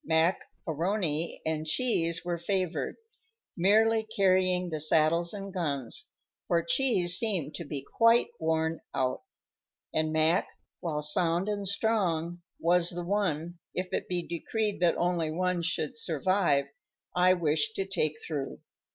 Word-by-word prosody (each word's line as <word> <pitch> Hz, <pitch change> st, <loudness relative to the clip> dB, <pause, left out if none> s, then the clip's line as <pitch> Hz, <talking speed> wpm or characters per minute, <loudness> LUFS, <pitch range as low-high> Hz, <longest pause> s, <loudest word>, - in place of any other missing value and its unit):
Mac 160 Hz, +3 st, +2 dB, 0.3 s
A'Rony 165 Hz, -1 st, -1 dB
and 160 Hz, -1 st, -1 dB
Cheese 170 Hz, -3 st, +1 dB
were 175 Hz, -1 st, -2 dB
favored, 185 Hz, 0 st, -2 dB, 0.6 s
merely 220 Hz, +5 st, +4 dB
carrying 185 Hz, -4 st, +1 dB
the 155 Hz, -2 st, -3 dB
saddles 160 Hz, +2 st, +3 dB
and 195 Hz, -1 st, -6 dB
guns, 140 Hz, -, -2 dB, 0.4 s
for 170 Hz, -1 st, +2 dB
Cheese 180 Hz, -4 st, +3 dB
seemed 185 Hz, -10 st, -1 dB
to 170 Hz, -, -6 dB
be 145 Hz, -2 st, -5 dB
quite 230 Hz, +6 st, +3 dB
worn 160 Hz, 0 st, 0 dB, 0.2 s
out, 130 Hz, -1 st, 0 dB, 0.7 s
and 155 Hz, 0 st, 0 dB
Mac, 160 Hz, +3 st, +3 dB, 0.3 s
while 150 Hz, -3 st, -3 dB
sound 170 Hz, +4 st, +2 dB
and 205 Hz, -1 st, -2 dB
strong, 175 Hz, -5 st, 0 dB, 0.2 s
was 175 Hz, +1 st, +3 dB
the 175 Hz, 0 st, -5 dB
one, 175 Hz, -4 st, -1 dB, 0.2 s
if 180 Hz, 0 st, -3 dB
it -, -, -2 dB
be 175 Hz, -1 st, -2 dB
decreed 210 Hz, +5 st, -2 dB
that 175 Hz, -2 st, +2 dB
only 175 Hz, -2 st, 0 dB
one 180 Hz, +2 st, -1 dB
should 180 Hz, +8 st, -2 dB
survive, 170 Hz, -6 st, +1 dB, 0.5 s
I 180 Hz, +1 st, +5 dB
wished 170 Hz, +5 st, +1 dB
to 195 Hz, -, -1 dB
take 155 Hz, -6 st, 0 dB
through. 145 Hz, -4 st, -4 dB
175 Hz, 135 wpm, -29 LUFS, 160-195 Hz, 0.7 s, I